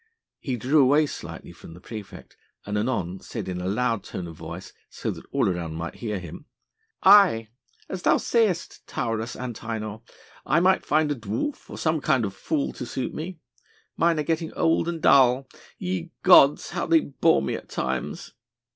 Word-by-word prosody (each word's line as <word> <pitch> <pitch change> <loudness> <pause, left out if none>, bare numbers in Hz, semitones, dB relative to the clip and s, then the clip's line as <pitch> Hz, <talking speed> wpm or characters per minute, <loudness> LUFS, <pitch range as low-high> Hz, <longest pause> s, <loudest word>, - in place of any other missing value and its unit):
He 130 -4 -3
drew 135 +7 +3
away 145 +4 +5
slightly - - -8
from 80 - -13
the - - -12
praefect 105 +1 -10 0.3
and 105 - -3
anon 105 -5 -1
said - - -6
in 90 -1 -4
a 90 - -3
loud 115 +1 0
tone 90 - -6
of 85 -1 -9
voice 85 +3 -9 0.2
so - - -4
that - - -10
all - - +2
around 85 -4 -2
him - - -6
might 85 +1 -5
hear: 105 -4 -3 0.8
"Aye! 190 - +6 0.4
as 190 - -5
thou - - +4
sayest, 215 -8 0
Taurus 115 0 -3
Antinor, 110 -3 -5 0.4
I 160 - +2
might 185 +2 +2
find 150 0 +2
a - - 0
dwarf 115 - -4
or - - -8
some 160 -2 0
kind 130 -5 +2
of 100 - -4
fool 145 +8 -2
to - - -6
suit 130 - -4
me. 165 +1 -6 0.5
Mine 165 -1 +2
are 150 - 0
getting 160 +1 -1
old 165 0 +2
and 170 -2 -4
dull. 130 0 +5 0.3
Ye 180 -3 -3
gods, 150 -6 +6
how 175 0 -2
they 165 -1 +5
bore 135 - +2
me 65 - -2
at - - -7
times!" 65 0 -3
125 Hz, 180 wpm, -25 LUFS, 105-165 Hz, 0.8 s, Aye